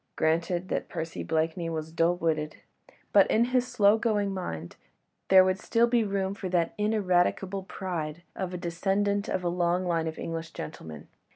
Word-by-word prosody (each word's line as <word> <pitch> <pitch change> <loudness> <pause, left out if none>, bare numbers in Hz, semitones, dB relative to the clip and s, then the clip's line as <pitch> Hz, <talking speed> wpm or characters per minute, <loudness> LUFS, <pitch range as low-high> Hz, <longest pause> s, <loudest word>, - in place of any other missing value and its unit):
Granted 170 +3 0
that - - -2
Percy 165 0 -5
Blakeney 160 +1 -1
was 160 -1 -4
dull 165 +2 +2
witted, 155 -3 -1 0.6
but - - +6
in 230 +2 +4
his 250 -1 +3
slow 220 -3 +4
going 210 -4 0
mind, 85 - -5 0.5
there 190 -1 +8
would 185 +1 0
still 230 +4 +2
be 235 -1 +2
room 195 -2 -1
for 200 -2 -5
that 175 -2 +1
ineradicable 195 -2 +1
pride 170 -3 -4
of 185 -2 -3
a 180 - -4
descendant 195 +4 0
of 185 - -1
a - - 0
long 175 +1 +1
line 165 -2 0
of 160 - -5
English 165 -1 -5
gentlemen. 80 -1 -8
180 Hz, 170 wpm, -28 LUFS, 165-200 Hz, 0.6 s, there